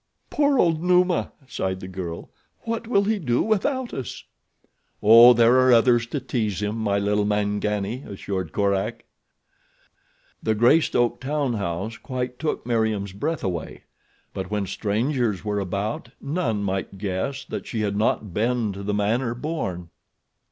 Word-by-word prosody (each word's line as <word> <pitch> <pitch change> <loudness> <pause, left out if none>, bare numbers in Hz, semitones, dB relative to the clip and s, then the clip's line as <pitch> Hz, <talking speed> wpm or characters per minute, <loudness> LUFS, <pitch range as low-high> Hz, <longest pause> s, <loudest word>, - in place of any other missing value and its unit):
"Poor 285 -2 +2
old 165 -7 +3
Numa," 180 0 +2 0.2
sighed 95 -7 -3
the 95 - -8
girl. 90 -3 -6 0.3
"What 230 0 -4
will 200 -4 +3
he 215 +1 0
do 125 -8 +1
without 240 +4 0
us?" 130 -5 -6 0.8
"Oh, 115 +3 +9
there 120 +2 +5
are 130 0 +5
others 120 0 +4
to 145 - -3
tease 120 -7 -2
him, 105 +1 -2
my 105 -3 0
little 105 +1 +1
Mangani," 105 +2 -1
assured 95 -4 -4
Korak. 100 +3 -1 1.4
The 110 - +1
Greystoke 120 0 +3
town 140 -1 -1
house 100 +2 -3
quite 125 0 -5
took 155 -6 -2
Meriem's 110 -5 0
breath 155 +11 -3
away; 85 -4 -4 0.5
but 95 -1 -5
when 105 -1 -1
strangers 110 +2 -1
were 105 -1 -1
about 100 +4 -3
none 135 - -1
might 95 0 -3
guess 100 +8 -3
that - - -6
she 110 - -3
had 100 -1 -1
not 105 -2 0
been 115 0 0
to 100 - -7
the 100 +1 -2
manner 115 +4 0
born. 120 - -4
110 Hz, 145 wpm, -24 LUFS, 100-130 Hz, 1.4 s, Oh